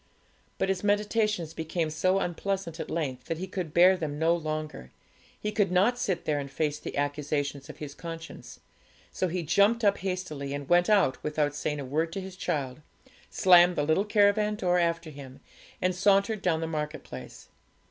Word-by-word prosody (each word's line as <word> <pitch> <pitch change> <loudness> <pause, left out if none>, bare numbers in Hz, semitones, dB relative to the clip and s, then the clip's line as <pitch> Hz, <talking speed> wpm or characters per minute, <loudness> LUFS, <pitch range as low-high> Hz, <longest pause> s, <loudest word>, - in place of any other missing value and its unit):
But 190 - 0
his 190 0 -1
meditations 205 -4 0
became 160 0 -2
so 185 +5 +1
unpleasant 190 -2 -3
at - - -5
length, 135 -6 -3
that 165 - -3
he 185 - -4
could 185 -4 -5
bear 180 +4 +6
them 155 -5 -4
no 165 +2 +3
longer; 155 - -5 0.5
he 210 - -2
could 205 -3 +1
not 205 +7 +3
sit 185 -7 -1
there 150 -2 0
and 140 -1 -5
face 150 +1 -2
the - - -6
accusations 145 -1 -2
of - - -9
his 145 -2 -7
conscience; 165 0 -9 0.5
so 185 - -1
he 175 0 -3
jumped 205 +9 +3
up 200 -1 +3
hastily, 180 -7 -4
and 145 -1 -6
went 175 +2 +4
out 200 -11 +3
without 150 -1 0
saying 150 0 -3
a 140 - -5
word 160 +5 -1
to - - -3
his 190 -1 -8
child, 140 -6 -3 0.5
slammed 180 -1 +6
the 145 - 0
little 160 +6 +2
caravan 210 0 +3
door 180 -3 +1
after 170 -1 -1
him, 135 -2 -11 0.4
and 185 0 +2
sauntered 200 +3 +2
down 165 -4 +1
the - - -1
marketplace. 150 - -6
170 Hz, 180 wpm, -28 LUFS, 150-190 Hz, 0.5 s, bear